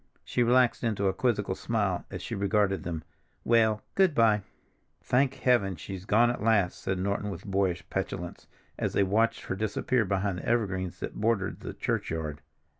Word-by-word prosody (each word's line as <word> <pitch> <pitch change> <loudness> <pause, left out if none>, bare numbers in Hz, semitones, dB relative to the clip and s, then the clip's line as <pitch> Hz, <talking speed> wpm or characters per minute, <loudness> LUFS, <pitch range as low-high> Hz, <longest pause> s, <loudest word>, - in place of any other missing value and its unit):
She 125 - 0
relaxed 125 +1 +3
into 105 -4 0
a 95 - +2
quizzical 105 -6 0
smile 100 -3 -1
as - - -6
she - - -5
regarded 100 -2 +1
them. 80 -2 -4 0.4
"Well, 110 -2 +3
good 190 -6 +3
by." 110 -2 +4 0.6
"Thank 130 +1 +1
Heaven! 120 -7 +2
she's 95 +3 -8
gone 115 +4 +4
at 120 - -5
last," 105 -5 +2
said 95 - -1
Norton 100 +2 -1
with 100 - -7
boyish 95 -3 0
petulance, 85 0 -4 0.3
as - - -1
they 100 - +3
watched 115 +4 +1
her - - -3
disappear 110 +4 0
behind 95 -1 -1
the - - -9
evergreens 95 -6 -1
that - - -5
bordered 105 -3 0
the - - -7
churchyard. 75 -3 -2
100 Hz, 170 wpm, -28 LUFS, 95-115 Hz, 0.6 s, by